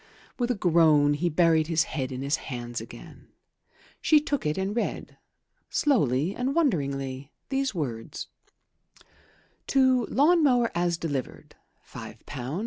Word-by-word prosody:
With 240 Hz, 0 st, 0 dB
a 245 Hz, -, +1 dB
groan 160 Hz, -6 st, +4 dB
he 175 Hz, +4 st, 0 dB
buried 160 Hz, -1 st, +3 dB
his 160 Hz, -1 st, +2 dB
head 135 Hz, -3 st, -4 dB
in 130 Hz, +1 st, -5 dB
his 140 Hz, +3 st, +1 dB
hands 120 Hz, -2 st, -6 dB
again. -, -, -12 dB, 0.7 s
She 310 Hz, -, +5 dB
took 285 Hz, -, -2 dB
it 150 Hz, -, -1 dB
and 190 Hz, +2 st, -2 dB
read, 235 Hz, -, -3 dB, 0.5 s
slowly 175 Hz, -, +1 dB
and 260 Hz, +3 st, -2 dB
wonderingly, 140 Hz, -, -1 dB, 0.2 s
these 270 Hz, -4 st, -1 dB
words: 120 Hz, -9 st, -4 dB, 1.4 s
"To 260 Hz, -2 st, +3 dB
lawn 325 Hz, +5 st, +4 dB
mower 245 Hz, -5 st, +3 dB
as 170 Hz, 0 st, 0 dB
delivered, 145 Hz, -7 st, -5 dB, 0.3 s
£5 -, -, -9 dB
17s. 135 Hz, +4 st, -5 dB
165 Hz, 135 wpm, -26 LUFS, -, 1.4 s, She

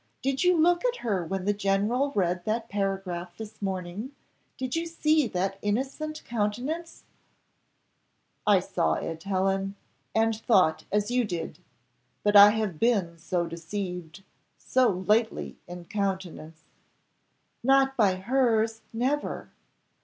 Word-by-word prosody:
Did 270 Hz, +2 st, 0 dB
you 360 Hz, -1 st, +4 dB
look 345 Hz, +2 st, +3 dB
at -, -, +1 dB
her 195 Hz, -6 st, 0 dB
when 190 Hz, 0 st, -3 dB
the 205 Hz, -, +2 dB
general 205 Hz, +7 st, +1 dB
read 180 Hz, -2 st, +1 dB
that 225 Hz, +1 st, -1 dB
paragraph 190 Hz, -3 st, -3 dB
this 220 Hz, -1 st, -9 dB
morning 195 Hz, +6 st, -4 dB, 0.4 s
did 260 Hz, +1 st, -3 dB
you 335 Hz, +1 st, -1 dB
see 310 Hz, -3 st, +2 dB
that 195 Hz, 0 st, -2 dB
innocent 270 Hz, +8 st, -2 dB
countenance?" 245 Hz, +10 st, -3 dB, 1.4 s
"I 200 Hz, -3 st, +5 dB
saw 175 Hz, -1 st, 0 dB
it, 165 Hz, 0 st, -5 dB
Helen, 195 Hz, +1 st, 0 dB, 0.4 s
and 225 Hz, 0 st, +3 dB
thought 200 Hz, -7 st, +2 dB
as 210 Hz, +2 st, +1 dB
you 250 Hz, 0 st, +2 dB
did, 175 Hz, -6 st, -4 dB, 0.6 s
but 205 Hz, 0 st, +2 dB
I 205 Hz, 0 st, +11 dB
have 210 Hz, -7 st, -2 dB
been 195 Hz, -8 st, +1 dB
so 170 Hz, +1 st, -1 dB
deceived 175 Hz, +1 st, -6 dB, 0.3 s
so 255 Hz, -1 st, +2 dB
lately 210 Hz, +5 st, 0 dB
in 175 Hz, 0 st, -8 dB
countenance!" 185 Hz, -6 st, -4 dB, 1.0 s
"Not 270 Hz, +1 st, +4 dB
by 200 Hz, -6 st, +3 dB
hers 225 Hz, +1 st, +1 dB
never." 260 Hz, +6 st, -2 dB
205 Hz, 125 wpm, -27 LUFS, 185-245 Hz, 1.4 s, I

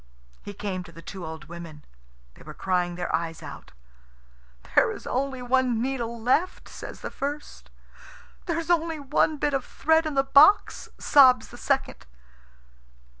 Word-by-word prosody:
He 205 Hz, -, -9 dB
came 190 Hz, -2 st, -4 dB
to 170 Hz, -, -13 dB
the 165 Hz, 0 st, -13 dB
two 190 Hz, +2 st, -8 dB
old 160 Hz, -1 st, -7 dB
women. 165 Hz, -2 st, -10 dB, 0.5 s
They -, -, -19 dB
were -, -, -11 dB
crying 180 Hz, -2 st, -1 dB
their 175 Hz, 0 st, -1 dB
eyes 165 Hz, -1 st, -4 dB
out. -, -, -10 dB, 1.0 s
"There -, -, +4 dB
is -, -, -9 dB
only 260 Hz, -1 st, -2 dB
one 250 Hz, -2 st, +1 dB
needle 235 Hz, -2 st, -3 dB
left!" 260 Hz, +10 st, 0 dB
says -, -, -9 dB
the -, -, -6 dB
first. 290 Hz, +2 st, -6 dB, 0.8 s
"There 335 Hz, -2 st, -1 dB
is 335 Hz, +1 st, -2 dB
only 330 Hz, -2 st, +1 dB
one 295 Hz, +2 st, +1 dB
bit 290 Hz, 0 st, 0 dB
of 270 Hz, -2 st, 0 dB
thread 320 Hz, +4 st, +1 dB
in 305 Hz, -, -4 dB
the 270 Hz, -, +3 dB
box!" 285 Hz, +9 st, +4 dB
sobs 255 Hz, -6 st, +5 dB
the -, -, -12 dB
second. 270 Hz, -, -2 dB
255 Hz, 160 wpm, -26 LUFS, 180-290 Hz, 1.0 s, sobs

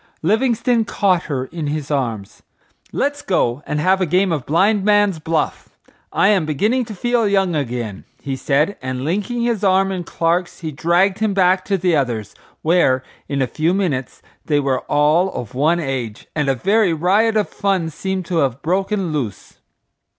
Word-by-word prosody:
Livingstone 230 Hz, +4 st, +2 dB
caught 190 Hz, -5 st, +1 dB
her 130 Hz, -4 st, -2 dB
in 155 Hz, +2 st, -5 dB
his 150 Hz, 0 st, -3 dB
arms. 115 Hz, -8 st, -3 dB, 0.5 s
"Let's 285 Hz, +1 st, -1 dB
go 135 Hz, -8 st, 0 dB
and 150 Hz, 0 st, -1 dB
have 190 Hz, +4 st, +2 dB
a 185 Hz, -, +1 dB
game 185 Hz, +3 st, +2 dB
of 150 Hz, -6 st, -2 dB
blind 195 Hz, +6 st, +2 dB
man's 205 Hz, -4 st, +3 dB
buff. 160 Hz, +1 st, -2 dB, 0.4 s
I 195 Hz, -, +3 dB
am 200 Hz, -5 st, +3 dB
beginning 215 Hz, -, +1 dB
to 220 Hz, -2 st, -8 dB
feel 240 Hz, +2 st, +1 dB
young 195 Hz, -4 st, +1 dB
again," 120 Hz, -8 st, -3 dB
he 135 Hz, -1 st, -4 dB
said, 145 Hz, +8 st, 0 dB
and 130 Hz, 0 st, -4 dB
linking 210 Hz, +8 st, -1 dB
his 235 Hz, -3 st, -1 dB
arm 195 Hz, 0 st, +3 dB
in 185 Hz, -2 st, -3 dB
Clark's, 170 Hz, +2 st, -1 dB
he 160 Hz, -2 st, -4 dB
dragged 175 Hz, +6 st, +2 dB
him 215 Hz, -3 st, 0 dB
back 185 Hz, 0 st, +3 dB
to 195 Hz, -, 0 dB
the 180 Hz, -2 st, +1 dB
others, 120 Hz, -7 st, -2 dB, 0.3 s
where, 155 Hz, -6 st, +3 dB, 0.3 s
in 140 Hz, -2 st, 0 dB
a -, -, +2 dB
few 160 Hz, +7 st, 0 dB
minutes 150 Hz, -10 st, -2 dB, 0.2 s
they 145 Hz, -2 st, +1 dB
were 135 Hz, -2 st, 0 dB
all 155 Hz, +6 st, +3 dB
of 125 Hz, +1 st, -6 dB
one 155 Hz, +6 st, +2 dB
age, 130 Hz, -8 st, -4 dB
and 150 Hz, -3 st, 0 dB
a 135 Hz, -, +2 dB
very 195 Hz, -, +2 dB
riot 200 Hz, +7 st, +2 dB
of 210 Hz, -, +1 dB
fun 190 Hz, -5 st, -1 dB
seemed 190 Hz, +3 st, -3 dB
to 170 Hz, 0 st, -2 dB
have 135 Hz, -3 st, 0 dB
broken 190 Hz, 0 st, -1 dB
loose. 125 Hz, -9 st, -5 dB
170 Hz, 180 wpm, -19 LUFS, 140-195 Hz, 0.5 s, man's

